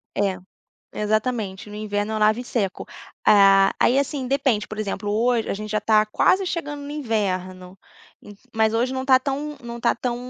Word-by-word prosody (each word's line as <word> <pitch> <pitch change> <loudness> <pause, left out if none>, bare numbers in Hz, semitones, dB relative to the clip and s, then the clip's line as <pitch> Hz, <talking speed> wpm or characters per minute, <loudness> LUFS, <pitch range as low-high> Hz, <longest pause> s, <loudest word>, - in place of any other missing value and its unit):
É, 195 -2 0 0.6
exatamente 210 -2 -2
no 210 - -9
inverno 210 0 -3
eu 220 - -1
lavo 215 +1 +3
e - - -7
seco. 205 -6 -3 0.4
Ah, 195 -1 +6
aí, 255 - +3
assim, 280 -1 -2
depende, 265 -5 0
por 215 - -8
exemplo, 205 -1 -3
hoje 230 +1 +1
a - - -1
gente 215 +1 -7
já 215 - +1
está 215 0 +3
quase 375 - +2
chegando 295 -5 -4
no 285 - -8
inverno, 190 -9 -3 0.4
ent 205 -1 -13 0.2
mas 220 0 +2
hoje 240 +3 0
não 260 - -2
está 260 -1 +5
tão 290 +2 -4
não 235 0 -7
está 235 - +1
tão 240 0 -3
220 Hz, 185 wpm, -23 LUFS, 205-255 Hz, 0.6 s, Ah